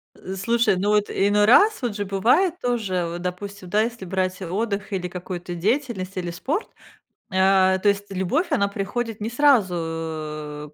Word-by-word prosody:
Э, 190 +1 -7
слушай, 230 +2 +2
ну, 200 +3 0
вот 210 -1 +2
иной 205 +1 +3
раз, 410 - +5
вот 235 -4 -2
же 205 - -2
бывает 270 - +2
тоже, 200 -8 -1
вот, 175 +1 -5
допустим, 180 +1 -6
да, 210 +4 +3
если 230 -3 -3
брать 185 0 -2
отдых 200 +3 -3
или 180 -1 -2
какую-то 180 0 -6
деятельность, 195 - -1
или 175 -1 -3
спорт, 285 - -2 0.6
а, 190 0 +4
то 205 - +3
есть, 200 0 0
любовь, 195 - 0
она 200 - +2
приходит 205 +3 -4
не 220 - -2
сразу 165 - 0
195 Hz, 160 wpm, -23 LUFS, 180-225 Hz, 0.6 s, раз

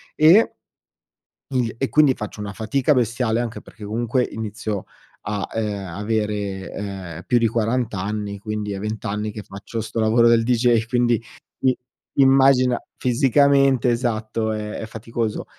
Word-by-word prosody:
e 165 +9 +6 1.0
il 125 -4 0
e 135 - -1
quindi 150 -4 +5
faccio 105 -2 -7
una 105 0 -5
fatica 130 +6 +1
bestiale, 120 -1 +1
anche 120 -1 -4
perché 105 - -13
comunque 120 +4 0
inizio 110 -2 -4 0.4
a, 105 -1 -3
ehm, 105 -3 -2
avere, 105 0 -2
ehm, 95 -5 -6
più 125 - +3
di 115 - +2
40 115 +1 0
anni, 100 +1 -3
quindi 105 0 -4
è 95 - -4
20 110 +2 -4
anni 105 0 -2
che 105 0 -7
faccio 100 +3 -7
sto 115 +1 -3
lavoro 115 +2 +4
del 115 -1 +4
DJ! 120 -1 +3
Quindi, 120 -1 +1 0.4
i 130 -1 +4 0.5
immagina 135 -2 +5 0.2
fisicamente 135 0 +3
esatto, 110 -2 -1
ehm, 105 0 -4
è 110 - -5
faticoso. 115 0 -4
110 Hz, 145 wpm, -22 LUFS, 105-125 Hz, 1.0 s, e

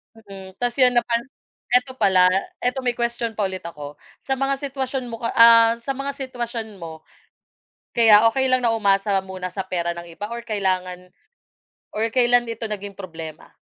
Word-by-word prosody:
Mm, 195 -3 -12
ta's 245 +2 -1
yun 250 -1 +5
na 240 - +4
pan 235 0 0 0.6
ito 250 +1 +3
pala, 185 -2 +5 0.3
ito 250 +2 0
may 245 -2 -1
question 235 -1 -2
pa 210 - -1
ulit 190 -1 -2
ako 145 -2 -9 0.2
sa 270 -1 -2
mga 275 0 +1
sitwasyon 265 -2 -4
mo 230 - -6
ka 230 - -2
ah, 230 0 +7
sa 235 +4 -5
mga 275 +1 -4
sitwasyon 235 -6 -6
mo, 160 -1 -9 0.9
kaya 225 -1 +7
okey 265 +3 0
lang 255 -1 +2
na 235 - +2
umasa 200 -1 +2
muna 185 -1 -6
sa 190 +1 -5
pera 170 -1 -2
ng 170 - -7
iba 210 +5 -6
or 235 0 -7
kailangan 185 -4 -2 0.8
or 220 +2 -1
kailan 245 -1 +3
ito 230 0 -6
naging 200 -1 -6
problema? 165 -4 -9
225 Hz, 175 wpm, -22 LUFS, 190-245 Hz, 0.9 s, ah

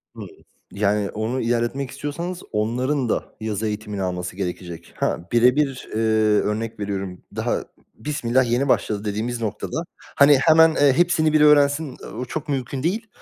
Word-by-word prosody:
Hımm. - - -8 0.4
Yani 100 0 0
onu 110 +5 -2
ilerletmek 120 +3 -1
istiyorsanız 170 +6 -5
onların 125 +4 0
da - - -2
yazı 110 0 -2
eğitimini 105 -1 -4
alması 90 -1 -3
gerekecek. 90 -3 -6
Ha, - - 0
birebir, 125 +3 +2
eee, - - 0 0.4
örnek 110 +1 -3
veriyorum; 95 -2 -4
daha - - -1 0.3
bismillah, 125 -1 0
yeni 135 +4 +1
başladı 105 -4 0
dediğimiz 115 +4 -3
noktada, 115 - -3 0.3
hani, 140 0 +7
hemen, 160 +3 +5
eee, 140 -2 +4
hepsini 160 -1 +2
bir 155 - +4
öğrensin, 145 -1 +4
eee, - - -8
o 125 +3 -5
çok 150 +4 -6
mümkün 135 0 -3
değil. 220 +7 -1
125 Hz, 150 wpm, -22 LUFS, 105-145 Hz, 0.4 s, hani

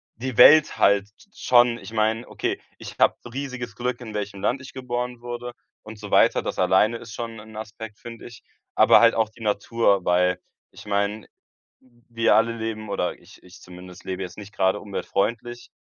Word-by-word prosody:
die 125 +1 -5
Welt 155 +5 +7
halt 100 0 +3 0.2
schon, 120 - +3
ich 115 - -11
meine 110 +2 0
okay, - - -3 0.2
ich - - -10
habe - - +4 0.2
riesiges 130 -4 -6
Glück, 125 0 -3
in 110 -3 -8
welchem 100 -2 -5
Land 125 +6 0
ich 130 - -12
geboren 125 -1 -4
wurde 120 0 -6 0.3
und 110 0 -10
so 105 -1 -10
weiter. - - +4
Das - - -5
alleine 95 +5 +3
ist 115 -1 -11
schon 115 -1 -6
'n 110 +1 -13
Aspekt, 110 0 -8
finde 115 -1 -11
ich. 120 -2 -14 0.3
Aber - - +6
halt 115 0 +5
auch 110 -1 +1
die 110 - -21
Natur, 105 -2 +1
weil 90 0 +2 0.3
ich - - -14
meine, 100 +1 -2 0.8
wir 115 -1 +2
alle 115 +1 +2
leben 110 -1 -5
oder 90 -3 -2
ich - - -18
ich 90 0 -16
zumindest 90 0 -13
lebe 95 0 -4
jetzt 90 - -8
nicht 105 +1 -11
gerade 95 +2 +1
umweltfreundlich. 115 +4 -3
110 Hz, 180 wpm, -24 LUFS, 100-120 Hz, 0.8 s, Welt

